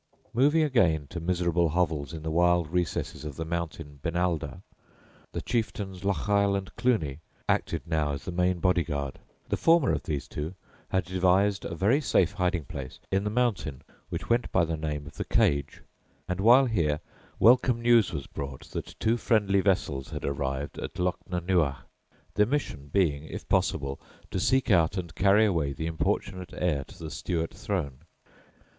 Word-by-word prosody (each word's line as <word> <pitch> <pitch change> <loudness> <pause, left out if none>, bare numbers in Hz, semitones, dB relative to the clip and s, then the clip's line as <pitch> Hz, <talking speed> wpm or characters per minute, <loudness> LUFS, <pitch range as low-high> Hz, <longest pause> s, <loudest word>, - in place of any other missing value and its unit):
Moving 145 +6 +4
again 90 - +2
to 90 - -4
miserable 85 -1 +1
hovels 75 -4 0
in 80 -2 -7
the 80 - -2
wild 85 -1 +3
recesses 90 -3 -1
of 75 -3 -6
the 80 - -4
mountain 80 -3 -4
Benalder, 85 -1 -1 0.7
the - - -4
chieftains 100 -5 -2
Lochiel 100 +2 +2
and 95 -1 -7
Cluny 80 - 0 0.3
acted - - 0
now 80 -3 0
as 70 - -6
the - - -3
main 90 +1 +1
bodyguard. 80 -6 0 0.3
The - - 0
former 165 -4 +4
of - - 0
these 75 -3 -3
two 80 +5 -5 0.3
had 95 -2 0
devised 95 +2 +2
a 85 - -4
very 110 - +3
safe 95 - +3
hiding 90 -5 -1
place 65 0 -7
in 95 +1 +2
the 105 - -1
mountain 105 - -1 0.3
which - - -4
went 120 +1 +1
by 90 -2 +3
the 80 0 -2
name 75 -2 -3
of 75 - -12
"the - - -1
Cage," 70 -1 +1 0.4
and 90 0 -2
while 125 +6 +7
here 85 -11 +1 0.4
welcome 125 +1 +5
news 115 -3 +4
was 70 - -4
brought 70 -2 -7
that - - -6
two 115 +2 +2
friendly 100 -5 +2
vessels 85 -9 0
had - - -5
arrived 70 0 -3
at - - -6
Lochnanuagh, 90 -4 0 0.6
their 105 0 +3
mission 115 - -2
being, 80 -7 +1
if - - -8
possible, 70 0 0 0.3
to - - -1
seek 130 -3 +2
out 85 0 +3
and 85 -3 -4
carry 100 +3 +4
away 80 -9 0
the 80 +4 -4
importunate 85 +3 -2
heir 80 -6 0
to - - -15
the 80 -2 -7
Stuart 80 +1 -2
throne. 75 -10 -3
90 Hz, 165 wpm, -28 LUFS, 75-100 Hz, 0.7 s, while